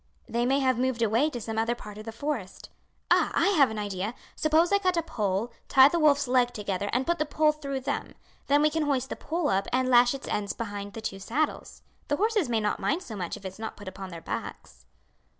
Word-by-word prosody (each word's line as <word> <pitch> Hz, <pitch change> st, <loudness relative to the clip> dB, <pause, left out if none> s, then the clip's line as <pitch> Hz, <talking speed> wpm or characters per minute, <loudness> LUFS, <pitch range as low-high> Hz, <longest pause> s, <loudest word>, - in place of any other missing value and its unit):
They 235 Hz, +1 st, 0 dB
may 270 Hz, +2 st, +3 dB
have 255 Hz, -2 st, +2 dB
moved 255 Hz, -2 st, 0 dB
away 230 Hz, +7 st, +3 dB
to 250 Hz, -5 st, -5 dB
some 220 Hz, 0 st, -3 dB
other 230 Hz, +2 st, +1 dB
part 210 Hz, -2 st, -10 dB
of 215 Hz, -, -9 dB
the 225 Hz, -, -5 dB
forest. 230 Hz, -5 st, -5 dB, 0.4 s
Ah! -, -, +4 dB
I -, -, +3 dB
have 295 Hz, -, +5 dB
an 220 Hz, -, -5 dB
idea! 205 Hz, +2 st, -3 dB, 0.2 s
Suppose 315 Hz, +3 st, +3 dB
I 400 Hz, -, +5 dB
cut 365 Hz, -3 st, +1 dB
a 335 Hz, -, +1 dB
pole, 210 Hz, -3 st, -2 dB, 0.2 s
tie 265 Hz, +1 st, +7 dB
the 340 Hz, -, 0 dB
wolf's 290 Hz, -3 st, +4 dB
legs 245 Hz, -1 st, +3 dB
together 205 Hz, -1 st, -3 dB
and 255 Hz, +2 st, 0 dB
put 345 Hz, 0 st, 0 dB
the -, -, +3 dB
pole 305 Hz, 0 st, +3 dB
through 280 Hz, -3 st, -5 dB
them; 260 Hz, -, -3 dB, 0.3 s
then 290 Hz, +1 st, +4 dB
we 305 Hz, -, +4 dB
can 320 Hz, 0 st, 0 dB
hoist 265 Hz, -2 st, 0 dB
the -, -, -3 dB
pole 330 Hz, 0 st, -2 dB
up 195 Hz, +1 st, +1 dB
and 255 Hz, +1 st, +1 dB
lash 245 Hz, +1 st, +5 dB
its 270 Hz, -, -8 dB
ends 200 Hz, -1 st, -2 dB
behind 205 Hz, -3 st, -6 dB
the 225 Hz, -, -7 dB
two 195 Hz, -3 st, -4 dB
saddles. 275 Hz, +10 st, -2 dB, 0.2 s
The 290 Hz, -, +1 dB
horses 420 Hz, -, +1 dB
may 230 Hz, -2 st, +2 dB
not 210 Hz, -1 st, -1 dB
mind 325 Hz, +7 st, 0 dB
so 220 Hz, -, -8 dB
much 180 Hz, -4 st, -4 dB
if 195 Hz, -, -14 dB
it's 190 Hz, +2 st, -7 dB
not 220 Hz, -, -6 dB
put 205 Hz, -, -11 dB
upon 190 Hz, 0 st, -7 dB
their 170 Hz, -2 st, -8 dB
backs." -, -, -7 dB
245 Hz, 240 wpm, -27 LUFS, 210-295 Hz, 0.4 s, tie